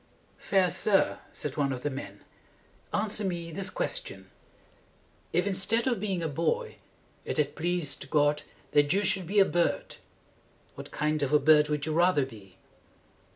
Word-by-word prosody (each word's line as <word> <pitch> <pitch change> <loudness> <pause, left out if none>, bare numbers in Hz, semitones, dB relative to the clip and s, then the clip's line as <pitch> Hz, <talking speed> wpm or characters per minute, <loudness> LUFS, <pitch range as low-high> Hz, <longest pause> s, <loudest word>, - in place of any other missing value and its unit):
"Fair 185 -3 +2
sir," 200 -3 +2
said 145 -2 -4
one 140 -2 +1
of 125 -1 -5
the 145 - 0
men, 100 -7 -8 0.7
"answer 210 0 -1
me 170 -3 -3
this 190 +4 -3
question: - - -3 1.0
If, - - +1
instead 200 +4 +1
of 245 -5 0
being 190 -4 -2
a - - 0
boy, 310 - -1 0.5
it - - -4
had 150 -2 0
pleased 160 -4 -2
God 145 0 +2 0.3
that 145 -1 +3
you 200 +2 +1
should 190 -2 +1
be 205 +4 -2
a 195 - +7
bird, 175 -2 -1 0.8
what - - -9
kind 150 0 -1
of 140 0 -1
a 150 - +6
bird 150 +1 +5
would 150 -1 -1
you 155 - -2
rather 170 -4 +3
be?" 100 -7 -14
165 Hz, 160 wpm, -28 LUFS, 145-195 Hz, 1.0 s, a